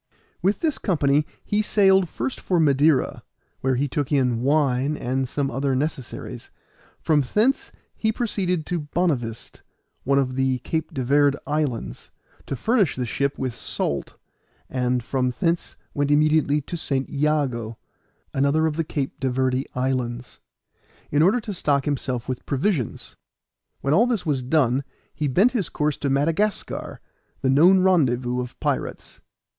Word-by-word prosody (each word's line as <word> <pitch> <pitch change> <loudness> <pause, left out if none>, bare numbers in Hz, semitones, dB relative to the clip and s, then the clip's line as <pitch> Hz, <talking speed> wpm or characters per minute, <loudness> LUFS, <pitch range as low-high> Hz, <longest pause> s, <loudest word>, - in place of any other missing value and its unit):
With 195 +4 +1
this 310 -4 0
company 150 -5 +2 0.2
he 210 0 +1
sailed 195 -4 +4
first 265 - -4
for 180 -2 0
Madeira, 145 -2 +3 0.4
where 130 0 +1
he 140 +3 0
took 145 +1 -2
in 125 -5 +2
wine 140 0 +2
and 130 +1 -2
some 140 -1 -1
other 135 +1 0
necessaries; 140 -2 -4 0.5
from 155 -2 +2
thence 215 - +1 0.2
he 220 - 0
proceeded 185 -8 -1
to 175 - -2 0.2
Bonavist, 130 -11 -1 0.4
one 140 +1 +2
of 130 -2 +1
the 130 -1 +1
Cape 160 +2 -2
de 135 -5 -3
Verde 145 +1 +3
islands, 145 -5 -2 0.4
to - - -2
furnish 205 - +2
the 125 - -2
ship 140 +4 -1
with 130 -2 -2
salt, 70 -10 -3 0.5
and 125 -1 0
from 125 0 0
thence 170 -2 -1 0.2
went 145 -1 0
immediately 150 0 +3
to 160 - -6
St. 135 -5 -1
Jago, 140 -7 -1 0.6
another 140 +4 +2
of 155 -1 -1
the 165 - +1
Cape 140 -3 -4
de 130 - 0
Verde 130 +1 0
islands, 125 -1 -2 0.7
in 145 - +3
order 195 +9 +4
to 210 -1 -5
stock 140 -6 +1
himself 130 -4 -2
with 130 -2 -5
provisions. 140 - -1 0.7
When 140 - +1
all 225 +9 +5
this 230 -7 -1
was 145 -4 0
done 130 -1 +2 0.3
he 150 - -2
bent 195 - +4
his 215 -10 -1
course 150 -1 -1
to 140 - -2
Madagascar, 165 +10 -1 0.4
the 130 - +2
known 180 +7 +6
rendezvous 130 -9 +2
of 125 - -8
pirates. - - -3
145 Hz, 150 wpm, -23 LUFS, 130-165 Hz, 0.7 s, known